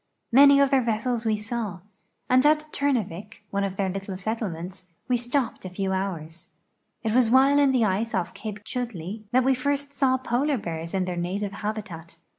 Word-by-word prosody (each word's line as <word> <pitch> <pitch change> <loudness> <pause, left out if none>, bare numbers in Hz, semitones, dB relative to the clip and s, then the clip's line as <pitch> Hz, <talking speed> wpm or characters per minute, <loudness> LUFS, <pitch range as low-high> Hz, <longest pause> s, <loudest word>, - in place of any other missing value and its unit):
INIany 280 +2 +8
of 275 - +1
their 270 -1 +4
vessels 235 0 -1
we 215 -1 +2
saw, 210 -4 -4 0.5
and 255 +1 +4
at 305 +1 +2
Turnavik. 215 -7 -2
one 200 0 0
of 195 -1 -2
their 195 -1 0
little 195 0 -4
settlements, 185 -4 -4 0.2
we 250 - +2
stopi)ed 245 +1 -1
a 185 - -5
few 190 +1 -2
hours. 170 -4 -4 0.6
It 220 -1 0
was 245 -2 +4
while 270 +3 +5
in 280 -2 +4
the 250 -4 +3
ice 215 +3 0
off 180 -2 -2
Cape 210 -1 -7
Chudleigh 215 -4 -5
that 255 +1 +4
we 265 +1 +4
first 280 +2 -2
saw 260 -2 +2
polar 260 +3 0
b.ears 165 -3 -5
in 185 -1 +1
their 180 -1 -4
native 195 +4 -2
habitat. 200 -6 -6
220 Hz, 185 wpm, -25 LUFS, 190-255 Hz, 0.6 s, INIany